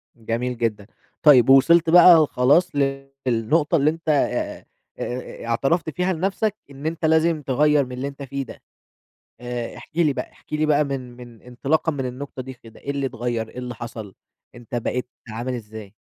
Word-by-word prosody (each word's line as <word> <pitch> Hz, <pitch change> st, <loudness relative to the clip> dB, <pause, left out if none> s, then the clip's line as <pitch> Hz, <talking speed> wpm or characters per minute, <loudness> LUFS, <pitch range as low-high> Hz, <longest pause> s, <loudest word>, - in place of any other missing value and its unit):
جميل 115 Hz, +2 st, -3 dB
جدًا، 110 Hz, -3 st, -2 dB, 0.4 s
طيّب 135 Hz, -5 st, +7 dB
ووصلت 160 Hz, +5 st, +6 dB
بقى 170 Hz, -2 st, +8 dB
خلاص 145 Hz, +8 st, +3 dB, 0.6 s
للنقطة 130 Hz, +8 st, +1 dB
اللي 145 Hz, 0 st, +3 dB
أنت 165 Hz, +1 st, -5 dB
آآ، 145 Hz, -2 st, 0 dB, 0.3 s
آآ، 125 Hz, -1 st, -6 dB
اعترفت 140 Hz, +8 st, 0 dB
فيها 180 Hz, +4 st, -1 dB
لنفسك 195 Hz, +4 st, -1 dB, 0.2 s
إن 140 Hz, +2 st, -10 dB
أنت 165 Hz, +1 st, -2 dB
لازم 160 Hz, 0 st, +3 dB
تغيّر 145 Hz, +1 st, +2 dB
من 125 Hz, -, -11 dB
اللي 125 Hz, +2 st, -4 dB
أنت 140 Hz, 0 st, -8 dB
فيه 140 Hz, +1 st, -4 dB
ده، -, -, -12 dB, 0.8 s
آآ، 120 Hz, -1 st, -5 dB
احكِ 160 Hz, -, -14 dB
لي 165 Hz, -4 st, +3 dB
بقى -, -, -6 dB
احكِ -, -, -24 dB
لي 155 Hz, 0 st, +1 dB
بقى 150 Hz, 0 st, +3 dB
من 130 Hz, -3 st, -5 dB
من 120 Hz, -2 st, -13 dB
انطلاقًا 135 Hz, +6 st, -1 dB
من 135 Hz, -3 st, -3 dB
النقطة 130 Hz, +1 st, -6 dB
دي 130 Hz, +1 st, -8 dB
كده، 115 Hz, -2 st, -16 dB
إيه 140 Hz, -, -5 dB
اللي 140 Hz, -1 st, -1 dB
اتغيّر، 120 Hz, -3 st, -3 dB
إيه -, -, -12 dB
اللي 125 Hz, -1 st, -5 dB
حصل، 115 Hz, -4 st, -8 dB, 0.4 s
أنت 120 Hz, 0 st, -11 dB
بقيت 125 Hz, +1 st, -2 dB, 0.2 s
عامل 120 Hz, +4 st, -4 dB
إزاي؟ 110 Hz, -3 st, -9 dB
135 Hz, 175 wpm, -22 LUFS, 120-155 Hz, 0.8 s, بقى